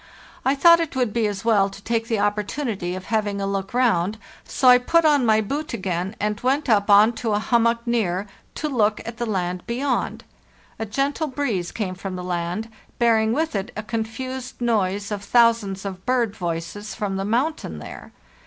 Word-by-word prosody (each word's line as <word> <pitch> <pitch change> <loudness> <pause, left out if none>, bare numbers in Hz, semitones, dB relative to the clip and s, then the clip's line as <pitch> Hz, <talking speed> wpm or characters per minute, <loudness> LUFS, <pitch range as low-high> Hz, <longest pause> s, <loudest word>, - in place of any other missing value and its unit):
I 270 - +2
thought 335 +4 +7
it 330 -4 -3
would 245 -5 0
be 230 -2 +1
as 205 0 -5
well 205 -4 +4
to 195 - -11
take 225 +2 -2
the 230 -2 0
opportunity 205 -2 -1
of 185 0 -7
having 205 -2 0
a 195 - -1
look 195 -1 -3
round, 220 -5 +1 0.3
so 260 - 0
I 250 0 +9
put 335 +6 +2
on 290 -5 +4
my 220 0 +4
boot 280 +5 -3
again 190 -1 -3
and 210 0 -2
went 275 +4 +1
up 210 -3 +3
on 210 +3 +7
to 225 -3 0
a - - +2
hummock 235 +1 +1
near 205 -6 0 0.3
to 305 - -2
look 220 -7 +1
at 230 0 -6
the 240 -1 -2
land 180 -3 -2
beyond. 255 +3 -1 0.6
A 225 - -3
gentle 280 +7 -1
breeze 245 -11 -2
came 195 -5 -3
from 190 0 -6
the 180 - -5
land, 180 +5 -3 0.3
bearing 225 -2 +3
with 315 +6 0
it 195 -2 -2
a 215 - -3
confused 240 +4 -5
noise 205 -4 0
of 205 -1 -3
thousands 230 -5 +2
of 190 -1 -6
bird 240 -4 0
voices 175 +4 -4
from 195 -2 -2
the 195 - -2
mountain 235 - -1
there. 75 - -10
220 Hz, 190 wpm, -23 LUFS, 195-245 Hz, 0.6 s, I